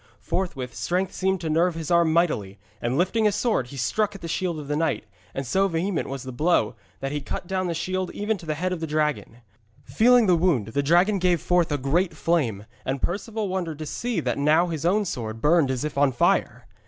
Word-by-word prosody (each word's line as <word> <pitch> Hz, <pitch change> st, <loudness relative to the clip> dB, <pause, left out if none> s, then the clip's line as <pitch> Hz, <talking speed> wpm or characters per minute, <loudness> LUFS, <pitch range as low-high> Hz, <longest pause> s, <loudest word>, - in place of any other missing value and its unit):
Forthwith 135 Hz, -10 st, -3 dB
strength 180 Hz, +6 st, -1 dB
seemed 190 Hz, -1 st, 0 dB
to 160 Hz, -, -3 dB
nerve 170 Hz, +2 st, +2 dB
his 165 Hz, 0 st, -5 dB
arm 170 Hz, -2 st, +4 dB
mightily, 120 Hz, -, +1 dB, 0.2 s
and 120 Hz, +3 st, -1 dB
lifting 200 Hz, +6 st, +2 dB
his 205 Hz, -1 st, +3 dB
sword 210 Hz, -, 0 dB
he 140 Hz, -, -10 dB
struck 205 Hz, -, 0 dB
at 195 Hz, -, -10 dB
the 170 Hz, -, -5 dB
shield 170 Hz, 0 st, -1 dB
of 145 Hz, -, -8 dB
the 145 Hz, -, -1 dB
knight, 160 Hz, -5 st, 0 dB, 0.3 s
and 135 Hz, -, -3 dB
so 190 Hz, +10 st, +2 dB
vehement 175 Hz, +1 st, -1 dB
was 135 Hz, -2 st, -5 dB
the 130 Hz, -, -6 dB
blow 130 Hz, -4 st, +2 dB, 0.3 s
that 135 Hz, -, -2 dB
he 145 Hz, 0 st, -2 dB
cut 135 Hz, -, -5 dB
down 185 Hz, 0 st, -1 dB
the 170 Hz, -, -2 dB
shield 185 Hz, +2 st, -2 dB
even 210 Hz, +2 st, 0 dB
to 170 Hz, -, -12 dB
the 155 Hz, -, -1 dB
head 185 Hz, +4 st, -1 dB
of 180 Hz, -, -4 dB
the 160 Hz, -, -3 dB
dragon. 150 Hz, -6 st, -1 dB, 0.4 s
Feeling 230 Hz, -, +4 dB
the 185 Hz, -, +4 dB
wound, 160 Hz, -, +1 dB
the 140 Hz, +5 st, 0 dB
dragon 175 Hz, +7 st, +3 dB
gave 180 Hz, -2 st, +2 dB
forth 175 Hz, -1 st, +1 dB
a 145 Hz, -, +1 dB
great 160 Hz, +6 st, 0 dB
flame, 125 Hz, -14 st, 0 dB, 0.2 s
and 135 Hz, +1 st, -2 dB
Perceval 210 Hz, -, -2 dB
wondered 180 Hz, -5 st, -3 dB
to 155 Hz, -, -6 dB
see 235 Hz, +8 st, -2 dB
that -, -, -1 dB
now 155 Hz, +5 st, +3 dB
his 160 Hz, 0 st, -2 dB
own 205 Hz, +3 st, +2 dB
sword 115 Hz, -, -4 dB
burned 150 Hz, +1 st, +3 dB
as 130 Hz, 0 st, -1 dB
if 150 Hz, -2 st, -2 dB
on 140 Hz, -1 st, +4 dB
fire. 120 Hz, -, +1 dB
165 Hz, 230 wpm, -25 LUFS, 140-185 Hz, 0.4 s, arm